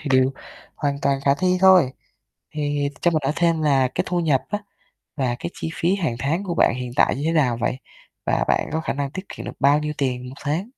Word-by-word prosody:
thì 150 - -5
điều 130 0 +4 0.4
hoàn 140 -1 -2
toàn 135 -1 +1
khả 140 - +4
thi 180 +5 +1
thôi. 185 -8 +6 0.6
Thì 145 -1 -1
cho 175 - +3
mình 160 -2 +1
hỏi 135 - +1
thêm 165 -2 +2
là 135 -4 +3
cái - - 0
thu 180 -1 0
nhập 150 -6 +2
á 205 - 0 0.6
và 130 -4 0
cái 170 - -4
chi - - -4
phí 175 +3 +1
hàng 160 -12 -1
tháng 160 +10 -1
của 175 -3 -2
bạn 140 - +3
hiện 125 -1 -5
tại - - +3
như 140 - -4
thế 165 - +1
nào 130 -8 +2
vậy? 125 - -1 0.5
Và - - +1
bạn - - +1
có 160 - 0
khả - - -2
năng 140 -1 -3
tiết 185 +6 -7
kiệm - - -8
được - - -5
bao 140 +2 +5
nhiêu 150 0 -2
tiền 125 -2 -1
1 130 - -9
tháng? 155 +7 -1
145 Hz, 245 wpm, -22 LUFS, 135-165 Hz, 0.6 s, thôi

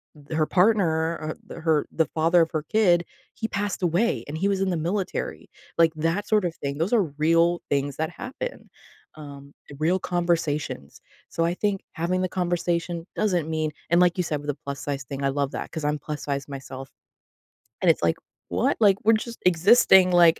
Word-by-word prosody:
th 150 +1 -7
her 155 - +3
partner 170 -4 +2
or 155 0 -4
th - - -8
her 160 -3 +2
the 160 - +1
father 165 +4 +3
of 165 - +1
her 155 -3 -2
kid, 175 -1 +3 0.3
he 220 - -3
passed 200 0 -2
away, 180 +7 +1
and 150 +2 -5
he 190 +5 +1
was 195 -1 0
in 195 - +1
the 175 - 0
military. 180 +5 -3 0.3
Like, 165 -1 +5
that 165 +6 -1
sort 210 -3 +3
of 170 -1 -2
thing. 140 0 -4
Those 165 +9 -1
are 225 -4 +5
real 165 +2 +3
things 140 0 -1
that 160 0 -1
happen, 265 - -7 0.5
um, 140 -2 -11 0.3
real 170 +4 +2
conversations. 165 - -2 0.3
So, 165 - -1
I 170 +1 +1
think 200 0 -1
having 175 +3 -1
the 185 - -1
conversation 175 -1 -1
doesn't 180 -7 0
mean 155 -1 -1 0.2
and 170 +1 +4
like 180 0 +3
you 180 - +1
said 150 -3 -2
with 145 - -10
the 145 -1 -2
plus 140 0 -5
size 140 -2 -4
thing, 140 +1 -6
I 140 - +2
love 140 0 -1
that - - -5
'cause 160 -2 -5
I'm 150 0 0
plus 150 +1 -6
size 140 -1 -3
myself. 135 -1 -8 0.9
And - - +4
it's - - +2
like, 85 -1 +2 0.3
"What?" 90 +2 +1
Like, 200 -3 +5
"We're 225 - +6
just 230 +2 -4
existing, 185 +1 +6
like" 170 -2 +6
165 Hz, 200 wpm, -25 LUFS, 150-185 Hz, 0.9 s, We're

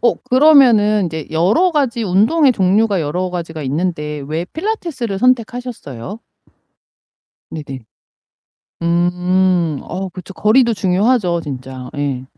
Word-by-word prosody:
어, 240 - +3 0.2
그러면은 245 -7 +5
인제 160 -3 -5
여러 190 - +2
가지 265 -6 0
운동의 225 - +3
종류가 200 0 +1
여러 180 +5 -2
가지가 165 -3 -5
있는데 150 0 -3
왜 160 +3 -2
필라테스를 315 - -4
선택하셨어요? 230 - -2 1.3
네네. 140 -4 -7 1.0
음, 175 -1 +1
어, 190 0 -5
그쵸. 185 +1 -10
거리도 235 +5 +3
중요하죠, 190 -1 +1
진짜. 130 -3 -8
예. 140 -3 -3
185 Hz, 255 characters per minute, -17 LUFS, 160-235 Hz, 1.3 s, 그러면은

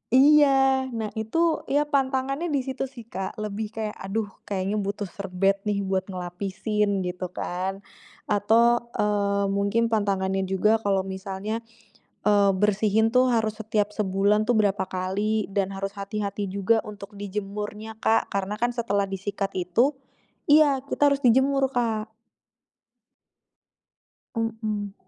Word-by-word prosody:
iya 270 -2 +5
nah 220 -2 -2
itu 320 +10 +1
ya 290 +1 +3
pantangannya 275 +3 0
disitu 270 -1 -2
sih 240 -4 -12
Kak, 190 -1 -5
lebih 215 +1 -4
kayak 220 -1 -4
aduh 205 +2 -3 0.2
kayaknya 195 +1 -2
butuh 205 0 -2
serbet 195 +1 -1
nih 205 -1 0
buat 190 -1 0
ngelapisin 195 +3 -2
gitu 180 0 -4
kan, 185 +2 -3 0.5
atau, 235 +3 +3
eee, 200 -1 +1
mungkin 200 +4 +1
pantangannya 195 -2 0
juga 210 +4 +2
kalau 195 -2 +1
misalnya, 195 +3 -4 0.7
eee, 205 -1 +5
bersihin 210 +2 +2
tuh 255 0 +4
harus 225 -3 +1
setiap 210 -1 0
sebulan 210 +2 +1
tuh 245 - +4
berapa 200 -2 +2
kali 200 +3 -1
dan 195 -1 -1
harus 195 0 -3
hati-hati 200 0 -3
juga 200 +4 +2
untuk 205 0 -9
dijemurnya 210 +2 -5
Kak, 225 - +2
karena 200 +1 -1
kan 240 +2 +1
setelah 205 -4 0
disikat 195 +1 -3
itu 185 +11 +2 0.6
iya 290 -2 +6
kita 285 0 +3
harus 280 - -1
dijemur 265 +2 +3
Kak. 220 -2 -1 2.3
Mhm. 220 -3 -2
210 Hz, 125 wpm, -25 LUFS, 195-230 Hz, 2.3 s, iya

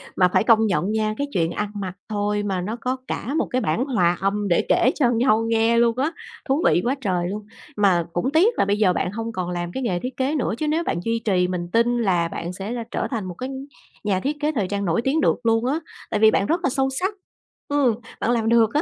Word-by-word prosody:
Mà 180 - +5
phải - - +4
công 225 -1 +5
nhận 190 +1 0
nha, 215 -1 0
cái 285 - -2
chuyện 165 -2 +1
ăn 210 +3 -3
mặc 185 -2 -4 0.2
thôi 205 0 -1
mà 190 -3 -1
nó 210 +5 -3
có 255 +1 -1
cả 270 - -3
một - - +1
cái 255 0 +1
bản 205 - 0
hòa 180 -10 +2
âm 200 +1 0
để 170 - +2
kể 255 - +4
cho 250 -6 +3
nhau 225 -2 +2
nghe 225 +1 +3
luôn 235 0 +3
á, 290 +5 +1 0.4
thú 285 +5 +2
vị 175 - +4
quá 265 +3 +1
trời 180 -5 0
luôn. 205 +1 -5 0.3
Mà 185 -5 +3
cũng 215 +11 0
tiếc 370 +10 +4
là - - +4
bây 200 +1 +1
giờ 195 -4 +3
bạn 180 - -1
hông 225 +2 -4
còn 185 -3 -3
làm 175 -1 -3
cái 265 - -4
nghề 180 -6 0
thiết 255 +4 -6
kế 270 +4 0
nữa 250 -7 0
chứ 305 - -2
nếu 320 +3 +1
bạn 170 - -1
duy 230 0 -1
trì 180 -4 +2
mình 175 -1 -3
tin 240 +1 +2
là 180 -7 +1
bạn 170 +1 -5
sẽ 195 +4 -5
là 240 -1 -3
trở - - -1
thành 225 -5 -2
một 180 -2 -6
cái 255 +6 -5 0.5
nhà 195 -3 +1
thiết 290 +7 -2
kế 300 +1 +1
thời 215 -11 -1
trang 200 0 -2
nổi 170 +6 +1
tiếng 280 +6 +1
được - - +2
luôn 225 +1 +2
á, 280 +5 0 0.3
tại 210 - 0
vì 220 0 +6
bạn 195 - +1
rất 335 - +1
là 275 - +2
sâu 270 +1 +1
sắc, 365 +10 -1 0.5
ừ, 285 -5 +2 0.3
bạn 240 - +1
làm 225 -2 +1
được 230 -2 +5
á. 300 - +3
220 Hz, 265 wpm, -23 LUFS, 190-255 Hz, 0.5 s, vì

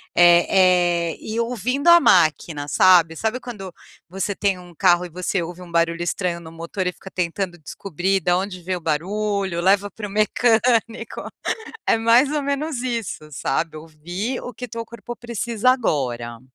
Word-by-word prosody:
eh 175 -1 +4
eh, - - -12
e 220 +2 -4
ouvindo 250 +6 0
a 340 0 +9
máquina, 155 - +2
sabe? 170 -2 +5
Sabe 220 +3 -1
quando 195 -8 -8 0.3
você 195 +2 -3
tem 195 -2 0
um 175 -1 -14
carro 180 0 +3
e - - -9
você 180 +2 -2
ouve 175 +2 -7
um 175 -1 -11
barulho 170 0 +1
estranho 175 0 -2
no 160 -1 -11
motor 170 +3 -4
e - - 0
fica 190 - -12
tentando 180 0 -3
descobrir 190 +4 -2
da 175 +2 +2
onde 185 -1 -4
vem 185 +2 -2
o - - -5
barulho, 190 +3 -1
leva 200 +2 +3
para 210 0 -6
o - - -11
mecânico. 230 +2 +1 0.7
É 225 - +3
mais 235 +5 +4
ou 295 -1 -1
menos 280 -1 -2
isso, 230 -11 -4
sabe? 155 +4 -2
Ouvir 175 +10 -5
o 245 - -7
que 250 - -7
o - - -22
teu 230 +1 -5
corpo 235 +1 -9
precisa 235 0 0
agora. 120 - -1
190 Hz, 175 wpm, -22 LUFS, 170-230 Hz, 0.7 s, a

